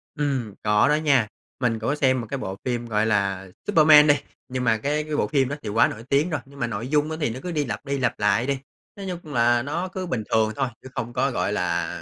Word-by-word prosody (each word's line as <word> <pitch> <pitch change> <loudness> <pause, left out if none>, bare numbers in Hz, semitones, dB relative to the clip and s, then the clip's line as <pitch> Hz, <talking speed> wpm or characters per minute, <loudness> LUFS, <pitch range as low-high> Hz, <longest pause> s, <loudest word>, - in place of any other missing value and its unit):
Ừm, 135 -7 -1
có 105 +2 +4
đó 150 - +4
nha. 140 -7 +3 0.3
Mình 115 -3 0
cũng 110 - -2
có 145 - +1
xem 130 -3 +2
một 115 - -8
cái 140 - -2
bộ 95 -7 -5
phim 120 -2 -1
gọi 110 -2 +1
là 100 -3 0 0.2
"Superman" 155 -5 +7
đi, 145 - +6 0.3
nhưng 130 0 -3
mà 115 -2 +3
cái 145 +7 -1
cái 155 0 -4
bộ - - +1
phim 135 -3 +1
đó 145 - -2
thì 110 - -4
quá 110 +3 +4
nổi 110 - -7
tiếng 145 +5 +2
rồi, 155 -4 -2
nhưng 140 +1 -15
mà 120 - 0
nội 115 +2 -4
dung 150 +2 +1
á, 160 - -3
thì 150 - +1
nó 115 +3 -5
cứ 180 - -4
đi 150 -3 0
lặp 120 - -5
đi, 140 0 -1
lặp 125 -3 -1
lại 105 +4 +2
đi. 140 -1 0 0.4
Nói 200 - -7 0.2
chung 150 -3 -10
là 120 0 +3
nó 165 +8 -3
cứ 185 0 -5
bình 125 -10 -2
thường 110 -1 +3
thôi 135 -2 0
chứ 130 - -11
không 120 +1 -4
có, 130 +2 +1
gọi 110 - -1
là, 90 -4 0
130 Hz, 275 wpm, -24 LUFS, 115-150 Hz, 0.4 s, Superman